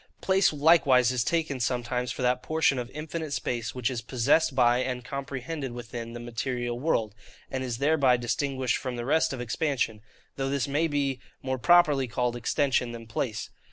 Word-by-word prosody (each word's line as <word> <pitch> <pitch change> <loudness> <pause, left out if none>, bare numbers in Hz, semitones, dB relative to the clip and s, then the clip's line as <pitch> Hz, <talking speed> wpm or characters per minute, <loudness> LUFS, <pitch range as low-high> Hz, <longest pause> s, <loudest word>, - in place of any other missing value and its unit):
Place 190 +1 +3
likewise 140 -5 +4
is 125 -2 0
taken 160 -2 -1
sometimes 125 +1 -1
for - - -4
that 125 0 +2
portion 155 -4 +1
of 120 0 -5
infinite 155 +1 -5
space 120 -4 -3
which 125 0 -1
is 120 -3 -3
possessed 130 +6 +2
by 120 -1 +4
and 125 -1 -3
comprehended 140 -1 -5
within 115 -1 -7
the 120 - -6
material 120 0 -3
world; 115 -8 0 0.4
and 130 -1 -2
is 120 -3 -3
thereby 140 -2 +3
distinguished 130 +1 -1
from 130 -2 -4
the 120 0 -4
rest 160 +5 +2
of 135 - -5
expansion; 120 -3 -1 0.4
though 135 0 -1
this 140 -2 0
may 150 +4 +1
be 140 -3 -1 0.2
more 130 -1 -2
properly 150 -3 +4
called 120 0 -1
extension 125 0 0
than 115 -1 -8
place. 110 -1 -3
130 Hz, 175 wpm, -27 LUFS, 120-145 Hz, 0.4 s, likewise